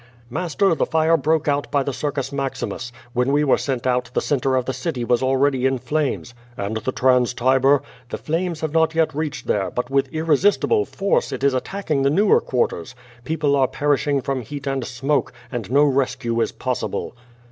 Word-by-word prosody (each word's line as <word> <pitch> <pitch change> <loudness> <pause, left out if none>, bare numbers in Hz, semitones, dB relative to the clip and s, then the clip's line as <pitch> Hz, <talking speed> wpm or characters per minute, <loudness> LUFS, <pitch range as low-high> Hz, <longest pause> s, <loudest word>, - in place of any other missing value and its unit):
"Master, 180 +5 +1
the - - 0
fire 160 +1 +3
broke 155 +1 +1
out 145 -1 0
by 140 -1 +1
the 140 - -3
Circus 140 -1 -3
Maximus. 135 -3 -4 0.2
When 125 +2 +1
we 145 +1 +3
were 140 - +3
sent 130 -3 -2
out, 125 -1 +1
the - - +3
centre 135 -2 0
of 130 -1 0
the 130 - -2
city 130 -1 -3
was 120 +1 +2
already 130 0 +2
in 130 0 0
flames." 135 -1 -2 0.2
"And 100 +2 -2
the 120 +4 -2
Trans 125 -1 +2
Tiber?" 130 +2 +3 0.3
"The - - -4
flames 165 +1 -2
have 155 -2 -2
not 160 0 +2
yet 160 -1 +2
reached 150 0 -4
there, 100 -2 0
but 125 +1 -4
with 135 -1 +1
irresist 160 +5 +2
ible 425 -2 +2
force, 200 0 0
it - - -5
is 140 -1 +3
attacking 155 +2 -2
the 135 - +3
newer 195 +8 +4
quarters. 105 -9 -2 0.3
People 150 -1 +1
are 135 -2 +3
per 145 +2 +1
ishing 140 -1 -1
from 135 -2 -2
heat 140 +4 -7
and 135 -2 -1
smoke, 135 +3 -1 0.2
and 120 -6 -4
no 140 +3 +4
rescue 130 -4 0
is - - 0
possible." 125 -1 -3
140 Hz, 200 wpm, -22 LUFS, 130-155 Hz, 0.3 s, newer